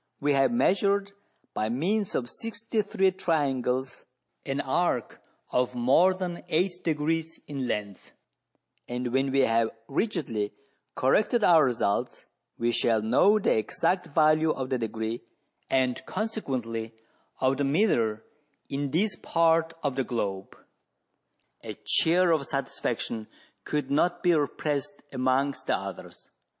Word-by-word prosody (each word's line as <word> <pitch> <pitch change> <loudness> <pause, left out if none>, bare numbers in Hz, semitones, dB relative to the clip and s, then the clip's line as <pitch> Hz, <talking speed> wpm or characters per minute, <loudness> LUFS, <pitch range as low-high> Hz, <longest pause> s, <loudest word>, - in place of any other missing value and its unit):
We 145 0 +2
have 135 +7 +3
measured, 200 -3 +2 0.4
by 110 - -1
means 185 - 0
of 120 - -1
sixty 225 - -3
three 195 -2 +1
triangles, 135 -8 -1 0.4
an - - -1
arc - - -1 0.3
of 125 0 0
more 135 +10 +4
than 180 -2 -4
eight 175 +2 0
degrees 160 +1 -1
in 135 -3 -4
lenc^th; 100 -4 -4 0.8
and 125 0 -3
when 135 +1 +1
we 135 0 +3
have 115 -2 +2 0.2
rigidly 140 - -2 0.4
corrected 210 - +2
our 165 -5 +6
results, 120 -5 -1 0.3
we 120 +1 +1
shall 115 -2 +1
know 160 - +4
the 210 - +2
exact 180 - 0
value 155 +1 +3
of 130 -4 -2
the 130 - +1
degree, 115 +1 -3 0.5
and 130 -1 +1
consequently 120 - -3 0.4
of 130 +1 +2
the 145 - 0
mHre, 135 - +1 0.5
in 140 0 -2
this 185 +7 +1
part 165 -1 +2
of 140 -3 -1
the 135 - 0
globe." 100 -6 -4 1.1
A - - -7
cheer 175 +2 +3
of 155 -4 +1
satisfaction 115 -4 -3 0.4
could 150 -1 -2
not 175 +7 +1
be 175 -1 +5
repressed 150 +3 -1
amongst 130 +2 0
the - - +3
others. - - -8
140 Hz, 130 wpm, -27 LUFS, 125-175 Hz, 1.1 s, our